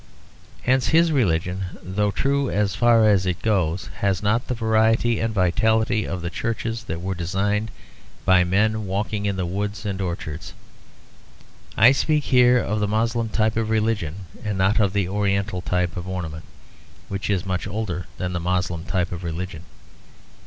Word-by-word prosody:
Hence 130 +1 +2
his 165 +1 +4
religion, 95 - 0 0.2
though 105 +3 0
true 140 +5 0
as 100 -2 0
far 115 +1 +4
as 95 -3 +3
it 90 -1 -1
goes, 95 -5 0
has 100 -1 0
not 115 +4 +1
the 125 - -1
variety 110 0 +2
and 115 0 0
vitality 110 +3 +2
of 90 -3 -4
the 85 - -3
churches 115 +2 -3
that 80 -5 -4
were 95 +1 -1
designed 100 +5 -1 0.6
by 95 -1 +5
men 105 +3 +1
walking 105 +2 -2
in 100 - 0
the 95 -1 -2
woods 100 +4 -3
and 100 -1 -3
orchards. 80 -3 -5 1.2
I 120 +4 +8
speak 150 +2 +1
here 125 -1 +5
of 105 -3 -1
the 105 - +1
Moslem 115 +2 0
type 110 0 +1
of 110 -1 -1
religion 105 -5 -1 0.2
and 105 -3 -2
not 95 +4 +2
of 100 -3 +2
the 100 -3 +1
oriental 100 -1 -1
type 90 0 -1
of 90 0 -5
ornament, 85 -4 -5 0.6
which 100 +1 -4
is 95 -2 0
much 95 0 -2
older 100 -4 -4
than 90 -1 -3
the 85 - -1
Moslem 90 -1 -1
type 90 -1 -1
of 90 0 -6
religion. 85 -1 -5
100 Hz, 165 wpm, -23 LUFS, 90-110 Hz, 1.2 s, I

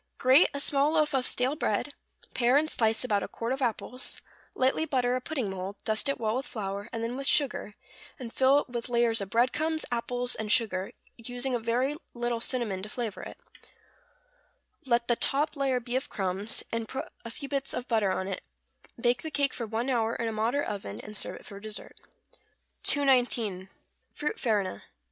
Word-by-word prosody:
= - - -50
Grate 260 +7 +6
a 280 - -4
small 285 +1 +3
loaf 305 -1 +3
of 260 -2 +2
stale 255 +4 +1
bread; - - -1 0.4
pare 245 +1 +3
and 310 +1 +2
slice 225 0 +2
about 210 -5 +1
a - - -3
quart 235 +2 -3
of 270 - -4
apples; 250 +1 -2 0.4
lightly 260 +4 +2
butter 255 -5 +1
a 255 - -1
pudding 260 -5 -2
mould, 190 +1 -5
dust 220 +5 +1
it 275 - -1
well 220 0 0
with 270 +3 -2
flour, 200 -5 -4
and 230 0 -3
then 235 +2 -2
with 275 +1 -3
sugar, 260 -7 +3 0.4
and 240 -4 -7
fill 270 +2 +5
it - - -11
with 240 0 -4
layers 235 -2 +3
of 195 - -4
bread 240 +4 +3
crumbs, 315 +1 +1
apples, 245 +1 -1
and 215 -1 -2
sugar, 195 -5 +2 0.3
using 245 +2 -2
a 245 - +1
very 240 +5 +1 0.2
little 240 -1 -1
cinnamon 230 -7 -1
to 210 - -6
flavor 230 -2 -4
it; - - -8 1.5
let 235 -1 +2
the 240 - +3
top 295 +6 +1
layer 270 -3 +1
be 245 +1 -4
of 260 - -1
crumbs, 195 +2 -1
and 230 -1 -2
put 265 - -5
a 230 - -6
few 280 +4 -7
bits 275 -1 -1
of 250 - -3
butter 220 -4 +2
on 185 0 -1
it; 195 - -3 0.6
bake 240 +1 +2
the 315 - -4
cake 285 -3 +1
for 235 - -4
one 225 +3 -1
hour 230 -3 +1
in 230 - -1
a - - 0
moderate 230 +6 0
oven; 150 - -5
and 210 - -9
serve - - -4
it - - -12
for 200 - -9
dessert. 215 0 -7 0.8
219. 240 -9 +3 0.5
=Fruit 300 - -2
Farina. 205 - 0
240 Hz, 200 wpm, -29 LUFS, 220-265 Hz, 1.5 s, Grate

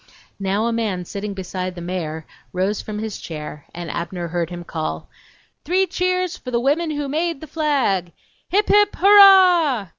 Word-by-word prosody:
Now 195 +3 0
a 235 - 0
man 205 -6 -2
sitting 200 +2 -5
beside 185 -1 -5
the - - -8
mayor 165 -3 -4 0.3
rose 190 +3 -1
from 210 -1 -6
his 215 -1 -5
chair 150 -2 -8
and 175 -2 -6
Abner 170 0 -4
heard 170 -1 -2
him 175 -1 -7
call: 80 - -5 0.6
"Three 370 +5 +2
cheers 365 0 -1
for 255 - -9
the 240 -1 0
women 295 +6 +1
who 295 -2 -3
made 325 +2 -1
the 315 - -9
flag!" 275 - 0 0.4
"HIP, 405 +3 +2
HIP, 415 0 +4
HURRAH!" 365 - +6
215 Hz, 170 wpm, -21 LUFS, -, 0.6 s, HURRAH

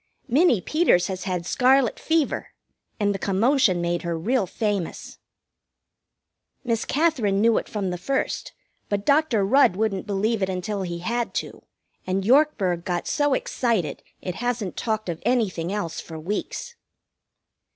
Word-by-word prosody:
Minnie 260 - +4
Peters 305 - +3
has 190 -1 -4
had 180 -3 -2
scarlet 255 +3 +3
fever, 320 -2 0 0.5
and 205 -1 +2
the 195 - -4
commotion 205 0 +2
made 175 0 -1
her 170 -1 -2
real 215 +4 0
famous. 205 -2 -3 1.4
Miss 230 -3 -1
Katherine 265 -11 +1
knew 225 +1 +4
it - - -10
from 200 -4 -2
the 180 - -4
first, 270 +9 -2 0.4
but 205 0 -1
Dr. 280 -8 +3
Rudd 255 -3 +4
wouldn't 205 -1 -1
believe 210 +2 0
it 190 - +1
until 190 +2 -3
he 175 -2 -3
had 235 +2 -1
to, - - -4 0.5
and 190 +1 -1
Yorkburg 215 - +3
got 175 -1 -2
so 290 -2 +2
excited 220 - -1 0.2
it 180 - -3
hasn't 235 -4 -2
talked 220 -2 -2
of 170 -2 -4
anything 205 -8 0
else 185 -6 -3
for 160 - -9
weeks. 205 - -4
205 Hz, 145 wpm, -24 LUFS, 185-245 Hz, 1.4 s, Minnie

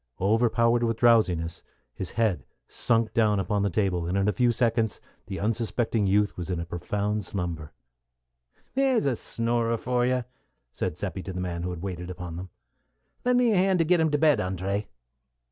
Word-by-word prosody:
Overpowered 115 +3 +3
with 115 -1 0
drowsiness, 95 -9 +3 0.3
his 95 +6 -5
head 110 -6 0 0.2
sunk 115 -1 +1
down 110 -3 +3
upon 100 +2 0
the 100 - +1
table, 90 -3 0
and 90 +3 -1
in 100 +1 +2
a - - +4
few 125 -1 +3
seconds 115 -2 0 0.3
the 95 -1 -5
unsuspecting 115 0 0
youth 100 +1 +2
was 90 0 -6
in 90 -2 -1
a 85 - -3
profound 100 +5 -2
slumber. 85 -5 -4 1.0
"There's 265 - +2
a 135 -3 +2
snorer 115 +1 -1
for 125 +2 0
you!" 125 -1 +1 0.5
said - - -3
Seppi 95 - -4
to 95 - -6
the 90 - -4
man 90 -2 -3
who 90 - -3
had 90 -1 -6
waited 90 -2 -5
upon 90 -2 -6
them. 90 +2 -7 0.7
"Lend 250 0 +3
me 245 -2 +4
a 205 - +3
hand 190 0 +3
to 165 - +2
get 175 +2 +3
him 160 -1 +3
to 150 - +1
bed, 150 -1 +4
André." 95 +3 -2
105 Hz, 185 wpm, -26 LUFS, 90-120 Hz, 1.0 s, a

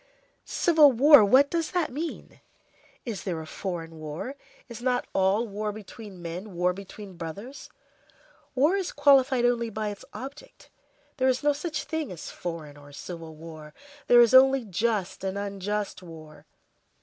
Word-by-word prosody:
Civil 310 -4 +5
war—what 275 0 +6
does 330 -2 -1
that 355 -6 -1
mean? 310 +5 -6 0.6
Is 215 -7 -4
there 175 -4 -3
a 160 - -7
foreign 165 -2 -6
war? 155 - -6 0.3
Is 235 -1 -9
not 250 0 0
all 195 +5 +2
war 210 +1 -3
between 205 -3 -11
men, 180 +4 -7
war 180 +1 +1
between 195 0 -11
brothers? 200 - -8 0.9
War 295 +8 +3
is 385 -3 -2
qualified 270 -3 +4
only 235 -1 +1
by 215 0 -3
its 205 - -8
object. 275 +3 -10 0.5
There 260 -1 +2
is 260 +2 +1
no 295 0 +3
such 300 0 -4
thing 310 -1 -4
as 175 - -8
foreign 160 -4 -7
or 145 0 -15
civil 165 +2 -9
war; 155 -1 -11 0.3
there 240 0 +7
is 235 +1 +4
only 265 -1 +6
just 205 -1 -2
and 190 +1 -3
unjust 200 0 -3
war. 155 -3 -13
210 Hz, 150 wpm, -26 LUFS, 175-265 Hz, 0.9 s, there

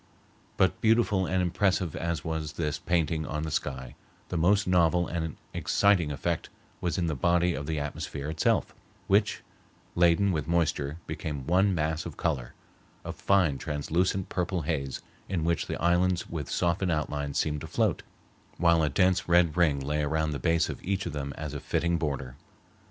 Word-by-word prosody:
But 95 - +2
beautiful 110 -4 +3
and 95 0 +1
impressive 90 -1 +1
as 85 -3 -3
was 80 -2 -3
this 75 -3 -2
painting 80 -2 0
on 75 0 -3
the 80 - -3
sky, 65 -4 -3 0.4
the - - -3
most 100 +5 +3
novel 90 -1 +3
and 80 -3 -3 0.2
exciting 95 -7 +2
effect 85 +4 -2 0.3
was 90 +1 -1
in 90 - +1
the 80 - 0
body 85 +5 +2
of 70 -1 -5
the 80 -2 -1
atmosphere 70 0 -4
itself, 80 +1 +1 0.3
which, 105 +2 +2 0.5
laden 85 +3 +4
with 80 -4 -2
moisture, 80 -3 0
became 70 -4 -5
one 95 +4 +3
mass 80 +1 -1
of 80 - -9
color—a 65 -8 -5
fine 90 -9 +2
translucent 85 +5 -1
purple 90 -2 -2
haze 70 -4 -3 0.3
in 90 -4 -1
which 85 0 0
the - - -4
islands 90 +1 +2
with 80 -4 -5
softened 90 +1 +1
outlines 75 -2 -2
seemed 75 -2 0
to - - -6
float, - - 0 0.6
while 85 -1 +4
a 75 - +2
dense 90 +5 +2
red 85 -3 +4
ring 80 -6 +3
lay 75 +3 -1
around 80 +1 0
the 70 - -3
base 85 0 +2
of - - -7
each 100 +1 -1
of 85 - -4
them 70 -1 -4
as 75 -2 -5
a 70 - -4
fitting 85 +3 0
border. 70 -5 -3
85 Hz, 170 wpm, -28 LUFS, 75-90 Hz, 0.6 s, laden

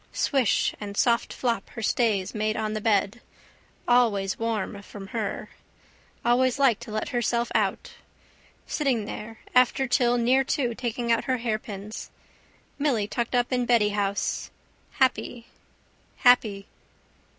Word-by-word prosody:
Swish 270 -6 +1
and 200 -1 -6
soft 235 -3 +2
flop 235 -2 -2
her 225 - -5
stays 210 -4 +1
made 215 0 -1
on 215 -1 -2
the 215 - -3
bed. 210 +1 +1 0.7
Always 220 -6 +2
warm 220 -3 -2
from 195 -1 -10
her. 215 -2 -3 0.8
Always 250 +2 +3
liked 255 -6 +3
to 235 -2 -8
let 215 0 -2
her 240 - -1
self 235 +1 0
out. - - 0 0.7
Sitting 260 -8 0
there 220 +1 -7 0.2
after 250 +1 +4
till 245 0 +3
near 255 +3 +3
two 265 -3 -1
taking 235 0 -2
out 230 - +2
her 260 -1 +1
hairpins. 215 -2 -5 0.7
Milly 250 -8 +1
tucked 235 +3 -2
up 245 +1 +1
in 250 -1 0
beddyhouse. 210 -4 +1 0.4
Happy. 245 -2 0 0.7
Happy. 215 -5 +4
230 Hz, 130 wpm, -26 LUFS, 210-245 Hz, 0.8 s, after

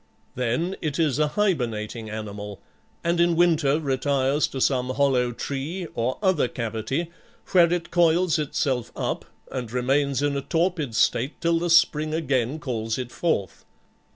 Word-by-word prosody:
Then 125 +10 -1
it 150 -3 -2
is 155 -5 +1
a 150 - +3
hibernating 120 - -1
animal, 105 -2 -6 0.4
and 170 0 +1
in 170 0 +4
winter 160 -4 +3
retires 140 0 +1
to 135 - -6
some 125 -1 +1
hollow 130 -2 +2
tree 145 +9 -4
or 120 +3 -1
other 185 -9 +3
cavity, 115 +8 -3 0.4
where 170 -2 +5
it 175 -1 -2
coils 170 -1 +3
itself 135 -4 -1
up - - -3 0.3
and 125 -4 -4
remains 135 +2 +1
in 145 -1 +1
a 140 - -1
torpid 165 -5 -1
state 130 +5 +1
till 170 0 +2
the 175 +1 -1
spring 155 -2 +4
again 135 -3 0
calls 115 -6 -3
it 125 -2 -5
forth. 130 - -2
140 Hz, 150 wpm, -25 LUFS, 125-165 Hz, 0.4 s, where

